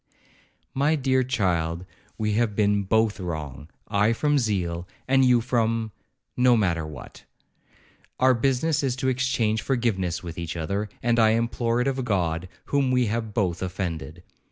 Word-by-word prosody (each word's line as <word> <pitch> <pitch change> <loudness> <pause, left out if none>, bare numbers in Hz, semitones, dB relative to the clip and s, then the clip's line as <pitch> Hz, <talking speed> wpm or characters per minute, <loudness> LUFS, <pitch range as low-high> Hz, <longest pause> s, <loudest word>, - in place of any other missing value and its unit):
'My 145 +4 +2
dear 130 -2 +2
child, 90 -9 -1 0.3
we 105 -1 0
have 110 -1 +1
been 105 -1 +2
both 110 +1 +1
wrong, 75 -4 -6 0.2
I 105 +3 +2
from 145 +4 +1
zeal, 90 -7 -2 0.2
and 135 +1 +4
you 125 -2 +4
from—no 115 +1 0
matter 85 -7 0
what; 75 - -11 0.9
our 130 0 +5
business 135 +5 +1
is 135 -3 0
to 130 0 -1
exchange 125 -4 0
forgiveness 95 -9 -1
with 85 -1 -7
each 85 0 -4
other, 100 +6 -2
and 120 0 +2
to 110 -1 +5
implore 115 +1 0
it 125 - 0
of 135 -1 -1
God, 90 -6 -1 0.2
whom 140 -2 +1
we 125 -1 +2
have 110 -3 -3
both 90 -6 0
offended. 90 -3 -4
110 Hz, 150 wpm, -25 LUFS, 90-125 Hz, 0.9 s, our